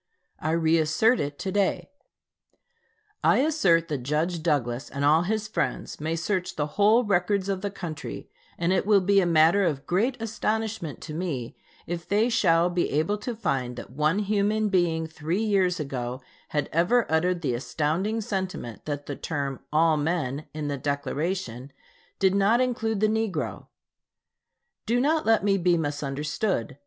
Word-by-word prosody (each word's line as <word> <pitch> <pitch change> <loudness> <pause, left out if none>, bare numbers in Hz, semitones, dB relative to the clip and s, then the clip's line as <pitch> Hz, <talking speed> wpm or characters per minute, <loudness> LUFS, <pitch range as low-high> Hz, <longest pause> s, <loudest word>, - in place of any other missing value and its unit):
I 155 - -2
re 165 0 +3
assert 160 +11 +3
it 145 0 -3
to 190 - -3
day. 200 +6 0 1.3
I - - +5
assert 195 - +3
that 145 -3 -2
Judge 155 +6 -1
Douglas 135 -6 -1
and 140 +1 -2
all 155 +3 +5
his 215 +4 -1
friends 170 -7 -3
may 160 +2 -1
search 180 +2 -2
the 145 - 0
whole 215 +4 +4
records 195 -1 +1
of 195 -1 -2
the 205 - -2
country, 175 -6 -7 0.3
and 170 +2 +1
it 190 - 0
will 205 -2 +5
be 200 +2 +4
a 180 - +1
matter 165 +4 +5
of 145 -6 -1
great 230 +8 0
astonishment 220 -6 -2
to 155 - -7
me 150 -8 -4 0.3
if 170 0 -5
they 215 +4 +3
shall 170 -7 +3
be 175 0 0
able 160 +8 0
to 235 +3 -4
find 135 - -2
that 120 - -9
one 155 +6 +1
human 210 +1 +1
being 170 -4 +1
three 160 +5 -2
years 190 -5 +2
ago 130 -3 -4 0.3
had 150 -2 -1
ever 180 +9 +3
uttered 175 +2 +1
the 130 - 0
astounding 165 - -1
sentiment 185 - -4
that 145 -1 -4
the 145 - -5
term 140 -4 -3
"all 155 +1 +3
men" 150 -2 -2
in 150 -1 -4
the 145 -1 -2
Declaration 140 -1 -3 0.5
did 190 -1 +3
not 200 +4 +3
include 225 -4 0
the 215 - +4
negro. 220 -2 -2 1.2
Do 235 +2 +2
not 305 +3 +1
let 225 -2 +4
me 195 -1 +2
be 175 -1 +3
misunderstood. 145 - -2
175 Hz, 165 wpm, -26 LUFS, 150-205 Hz, 1.3 s, I